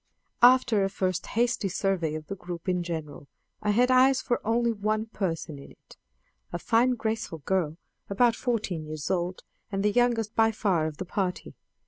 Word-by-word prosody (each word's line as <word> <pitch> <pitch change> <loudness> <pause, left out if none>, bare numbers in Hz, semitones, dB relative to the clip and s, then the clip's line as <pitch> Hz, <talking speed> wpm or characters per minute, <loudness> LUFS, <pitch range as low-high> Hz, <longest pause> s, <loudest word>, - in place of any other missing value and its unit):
After 245 -4 +6
a 195 - +1
first 185 -2 -2
hasty 235 -3 0
survey 180 -4 -1
of 155 0 -6
the 195 - -5
group 175 -2 -8
in 180 -1 +1
general, 160 -4 -6 0.3
I 210 - -1
had 245 +5 +3
eyes 260 +1 +5
for 240 - -1
only 235 +2 +2
one 215 +1 -1
person 165 -9 -4
in 140 - -12
it - - -19 0.6
a 175 - -2
fine 240 +7 +2
graceful 220 -9 -3
girl 170 -5 0 0.3
about 230 +4 +3
fourteen 205 - -2
years 155 -1 -4
old, 180 0 -2 0.3
and 195 0 -1
the 210 - +3
youngest 230 -2 +1
by 225 0 +4
far 185 -7 +1
of 155 -2 -7
the 185 - -5
party. 185 0 -3
200 Hz, 175 wpm, -27 LUFS, 175-230 Hz, 0.6 s, After